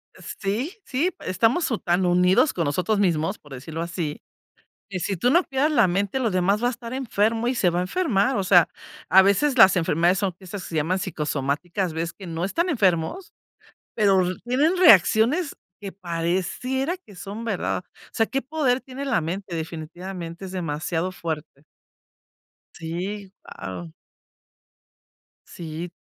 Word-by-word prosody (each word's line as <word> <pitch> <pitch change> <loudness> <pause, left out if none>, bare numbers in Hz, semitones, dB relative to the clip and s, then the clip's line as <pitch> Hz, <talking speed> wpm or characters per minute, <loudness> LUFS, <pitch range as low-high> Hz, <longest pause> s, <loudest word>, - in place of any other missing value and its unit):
Eh - - -16 0.2
sí, 225 - -2
sí, 295 +8 0
estamos 225 - +1
u 225 - +1
tan 180 0 +1
unidos 180 - +4
con 170 - -1
nosotros 185 +8 0
mismos, 175 +1 +1
por 145 -2 -14
decirlo 155 +5 -6
así, 170 -3 -4 0.7
que 185 -2 -4
si 195 +2 -2
tú 240 +9 +2
no 345 +5 +5
cuidas 275 +2 0
la 235 -9 +4
mente, 200 +6 0
lo 230 -4 0
demás 190 +4 +1
va - - +4
a 245 - +1
estar 235 0 -8
enfermo 230 -2 0
y 260 - -1
se 185 -6 +3
va 175 - -1
a - - +1
enfermar. 245 - +1
O 195 - 0
sea, 180 -2 +5 0.4
a 190 - +8
veces 255 +8 +2
las 190 -4 +8
enfermedades 175 +2 +2
son 195 -3 -1
esas 190 0 -7
que - - -8
se 165 - -6
llaman 160 +5 +1
psicosomáticas, 160 +1 -2
ves 165 +1 -3
que 195 - -11
no 170 +1 -3
están 340 - 0
enfermos, 200 - 0 0.6
pero 195 -3 +4
r 180 0 -2
tienen 290 +9 +2
reacciones 265 - +5 0.3
que 200 -1 -6
pareciera 190 - -2
que 215 - -17
son 200 +4 -7
verdad. 200 -4 -2
O - - -22
sea, 225 - +2
qué 270 +5 -2
poder 270 -3 0
tiene 260 +2 -8
la 245 -8 +2
mente 180 +3 -5
definitivamente, 170 +2 -6
es 185 - -8
demasiado 165 +1 -2
fuerte. 155 -4 -6 1.1
Sí, 185 +4 -5
guau. 90 -4 -8 1.6
Sí. 165 +1 -7
190 Hz, 165 wpm, -24 LUFS, 170-235 Hz, 1.6 s, a